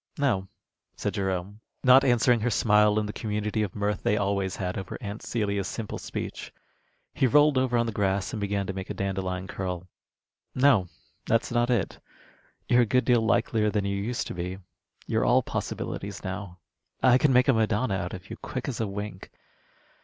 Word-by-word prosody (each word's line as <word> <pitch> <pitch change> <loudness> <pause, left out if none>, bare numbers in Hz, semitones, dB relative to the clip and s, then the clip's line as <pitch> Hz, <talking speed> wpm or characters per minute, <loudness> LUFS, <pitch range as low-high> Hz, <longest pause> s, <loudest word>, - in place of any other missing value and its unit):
"No," 120 -10 +1 0.5
said - - -2
Jerome, 95 +1 -2 0.2
not 130 +1 +7
answering 120 -2 +4
her 120 +3 0
smile 105 -1 +4
in 105 - +1
the 105 - -5
community 105 -1 -2
of 105 -4 -3
mirth 105 0 -1
they 105 - +1
always 100 -2 0
had 90 -1 -3
over 95 -2 -5
Aunt 105 +1 -6
Celia's 100 -4 -1
simple 115 -3 -5
speech. - - -6 0.6
He 130 - +2
rolled 150 +3 +5
over 130 -2 +2
on 120 - +2
the 115 - -2
grass 100 -2 0
and 105 - -3
began 100 -1 -1
to 95 - -4
make 95 0 -6
a - - -4
dandelion 95 -1 -2
curl. 90 -2 -4 0.7
"No, 130 -8 +4 0.4
that's 115 +1 +1
not 120 0 +2
it. 120 -6 0 0.7
You're 125 0 +5
a - - +4
good 125 +4 +2
deal 120 -2 +4
likelier 110 -1 +2
than 105 -1 -1
you 100 0 -1
used 110 +5 -2
to - - -5
be. 90 +1 -4 0.5
You're - - 0
all - - +4
possibilities 100 0 -4
now. 95 -1 -5 0.5
I 130 0 +6
could 150 - +4
make 125 +1 +4
a 135 - +5
Madonna 110 0 +1
out 95 -2 -3
of 95 +1 -11
you, 115 - -6
quick 130 - -5
as 135 - -3
a 110 - 0
wink. 100 -1 -6
105 Hz, 190 wpm, -27 LUFS, 95-120 Hz, 0.7 s, not